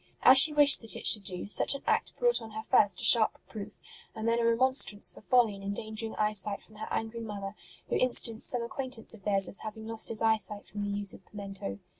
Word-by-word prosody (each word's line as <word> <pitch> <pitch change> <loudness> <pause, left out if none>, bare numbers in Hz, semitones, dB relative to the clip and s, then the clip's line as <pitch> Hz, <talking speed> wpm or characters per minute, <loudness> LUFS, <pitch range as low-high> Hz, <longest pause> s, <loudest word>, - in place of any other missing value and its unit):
As 265 +1 +8
she 305 - +9
wished 290 -1 +5
that 225 - +2
it - - -9
should 210 - +6
do, 185 -1 -5
such 210 - -1
an 275 - -10
act - - -3
brought 485 -1 +1
on 225 - -11
her 220 0 -8
first 200 -3 +1
a - - -8
sharp 225 -3 +4
reproof 210 -1 -12 0.4
and 220 0 -6
then 230 +1 -1
a - - -2
remonstrance 230 -2 0
for - - -17
folly 235 -2 +1
in 195 - -13
endangering 215 +3 -6
eyesight 210 -1 -2
from 215 - -20
her 215 - -8
angry 225 +1 -6
mother, 200 -3 -8 0.3
who - - -3
instanced 235 -3 +1
some 245 -2 -3
acquaintance 255 -1 -6
of 205 -4 -17
theirs 195 -2 +7
as - - 0
having 220 0 -10
lost 225 0 -1
his 225 0 -3
eyesight 220 -2 -1
from 205 - -9
the 205 0 -5
use 205 -1 -2
of - - -16
pimento. 200 -1 -9
220 Hz, 230 wpm, -27 LUFS, 205-230 Hz, 0.4 s, she